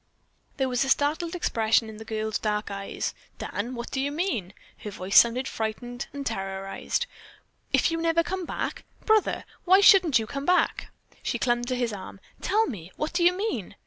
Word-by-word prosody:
There 265 Hz, -2 st, +1 dB
was 250 Hz, 0 st, +1 dB
a 270 Hz, -, -2 dB
startled 315 Hz, +5 st, +1 dB
expression 225 Hz, -8 st, +2 dB
in 220 Hz, -1 st, -9 dB
the 220 Hz, -, -8 dB
girl's 220 Hz, 0 st, -2 dB
dark 210 Hz, -1 st, -1 dB
eyes. 195 Hz, 0 st, -4 dB, 0.2 s
"Dan, 235 Hz, +5 st, -4 dB
what 235 Hz, 0 st, -6 dB
do 265 Hz, -, -1 dB
you 285 Hz, +1 st, -1 dB
mean?" 290 Hz, -, -2 dB, 0.2 s
Her 210 Hz, -, -6 dB
voice 195 Hz, -1 st, -4 dB
sounded 245 Hz, +3 st, +6 dB
frightened, 240 Hz, +2 st, -4 dB, 0.2 s
terrorized. 195 Hz, -, -2 dB, 0.7 s
"If -, -, +3 dB
you 330 Hz, 0 st, -1 dB
never 335 Hz, 0 st, +3 dB
come 370 Hz, +1 st, -3 dB
back? -, -, -4 dB, 0.2 s
Brother, 435 Hz, -1 st, +3 dB, 0.2 s
why 375 Hz, +2 st, +6 dB
shouldn't 375 Hz, -, +7 dB
you 220 Hz, -, -1 dB
come 275 Hz, +5 st, -5 dB
back!" 360 Hz, 0 st, +2 dB, 0.3 s
She -, -, -1 dB
clung 240 Hz, -1 st, +1 dB
to 255 Hz, +1 st, -1 dB
his 240 Hz, -3 st, -1 dB
arm. 195 Hz, 0 st, -8 dB, 0.2 s
"Tell 430 Hz, +4 st, +2 dB
me, 185 Hz, -, -7 dB
what 305 Hz, -, -3 dB
do 345 Hz, 0 st, +1 dB
you 350 Hz, +1 st, +6 dB
mean?" 390 Hz, -, -3 dB
245 Hz, 180 wpm, -26 LUFS, 215-335 Hz, 0.7 s, shouldn't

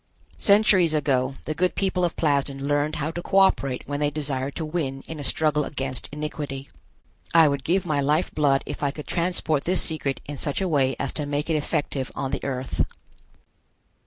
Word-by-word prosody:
Centuries 200 Hz, -6 st, +5 dB
ago 135 Hz, -3 st, +1 dB
the 155 Hz, -, -2 dB
good 180 Hz, +4 st, +1 dB
people 190 Hz, -2 st, 0 dB
of 175 Hz, -, 0 dB
Plasden 140 Hz, -2 st, 0 dB
learned 145 Hz, +1 st, +1 dB
how 150 Hz, +2 st, -2 dB
to 175 Hz, -, -5 dB
co 190 Hz, -, 0 dB
operate 140 Hz, -9 st, +3 dB
when 145 Hz, 0 st, -3 dB
they 145 Hz, -1 st, +2 dB
desired 140 Hz, -2 st, -2 dB
to 160 Hz, -, -3 dB
win 145 Hz, -4 st, -3 dB
in 160 Hz, -2 st, -7 dB
a -, -, -4 dB
struggle 150 Hz, +3 st, +1 dB
against 135 Hz, -3 st, -4 dB
iniquity. 145 Hz, -2 st, -5 dB, 0.7 s
I 165 Hz, -2 st, +8 dB
would 140 Hz, -2 st, -1 dB
give 185 Hz, +5 st, +1 dB
my 150 Hz, -4 st, +1 dB
life 150 Hz, +5 st, +1 dB
blood 140 Hz, -3 st, +2 dB
if -, -, -6 dB
I 145 Hz, -, +2 dB
could 150 Hz, +1 st, -7 dB
transport 170 Hz, -4 st, 0 dB
this 185 Hz, +1 st, +3 dB
secret 145 Hz, -4 st, -1 dB
in 145 Hz, 0 st, -6 dB
such 145 Hz, +1 st, -1 dB
a 190 Hz, -, 0 dB
way 135 Hz, -5 st, +2 dB
as 140 Hz, -, -3 dB
to 150 Hz, -2 st, -3 dB
make 145 Hz, +3 st, -1 dB
it -, -, +2 dB
effective 145 Hz, -3 st, -1 dB
on 135 Hz, -, -3 dB
the -, -, -3 dB
Earth. 130 Hz, -1 st, -1 dB
145 Hz, 195 wpm, -25 LUFS, 140-160 Hz, 0.7 s, I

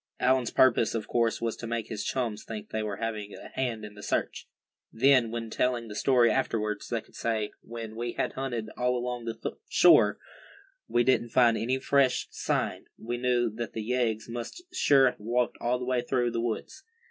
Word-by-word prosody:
Allan's 125 Hz, -2 st, +2 dB
purpose, 115 Hz, -3 st, +3 dB
of 110 Hz, -, -3 dB
course, 115 Hz, -1 st, +1 dB
was 115 Hz, -1 st, -1 dB
to 115 Hz, -, -6 dB
make 115 Hz, -1 st, -3 dB
his 110 Hz, -3 st, -4 dB
chums 115 Hz, -5 st, -2 dB
think 110 Hz, -2 st, -7 dB
they 110 Hz, -, -1 dB
were 105 Hz, -2 st, -3 dB
having 105 Hz, -1 st, -4 dB
a -, -, -10 dB
hand 120 Hz, -5 st, -3 dB
in 105 Hz, -, -10 dB
the 105 Hz, -, -12 dB
search. -, -, -2 dB, 0.4 s
Then, 130 Hz, 0 st, +4 dB
when 115 Hz, -1 st, -5 dB
telling 120 Hz, -2 st, 0 dB
the 105 Hz, -, -7 dB
story 120 Hz, -1 st, +4 dB
afterwards, 105 Hz, -1 st, -1 dB
they 115 Hz, -2 st, -1 dB
could -, -, -24 dB
say 110 Hz, -2 st, -1 dB
"when 115 Hz, -1 st, -8 dB
we 120 Hz, +1 st, -3 dB
had -, -, -2 dB
hunted 120 Hz, -5 st, -4 dB
all 125 Hz, 0 st, +1 dB
along 120 Hz, -1 st, -4 dB
the 115 Hz, -1 st, -5 dB
shore, -, -, +6 dB, 0.7 s
and 120 Hz, +1 st, +2 dB
didn't 130 Hz, -2 st, +2 dB
find 120 Hz, -1 st, +4 dB
any 125 Hz, +4 st, 0 dB
fresh 135 Hz, -1 st, +2 dB
sign, -, -, -2 dB
we 120 Hz, +2 st, -4 dB
knew 120 Hz, -1 st, +2 dB
that 115 Hz, +2 st, -5 dB
the 110 Hz, -, -4 dB
yeggs 115 Hz, -2 st, 0 dB
must 120 Hz, -, -6 dB
sure 140 Hz, -, +5 dB
have 125 Hz, -, 0 dB
walked 120 Hz, +3 st, -1 dB
all 125 Hz, +1 st, +1 dB
the 125 Hz, -, -5 dB
way 125 Hz, -1 st, +1 dB
through 120 Hz, -1 st, 0 dB
the 115 Hz, 0 st, -1 dB
woods." 120 Hz, -, -4 dB
120 Hz, 195 wpm, -28 LUFS, 110-125 Hz, 0.7 s, shore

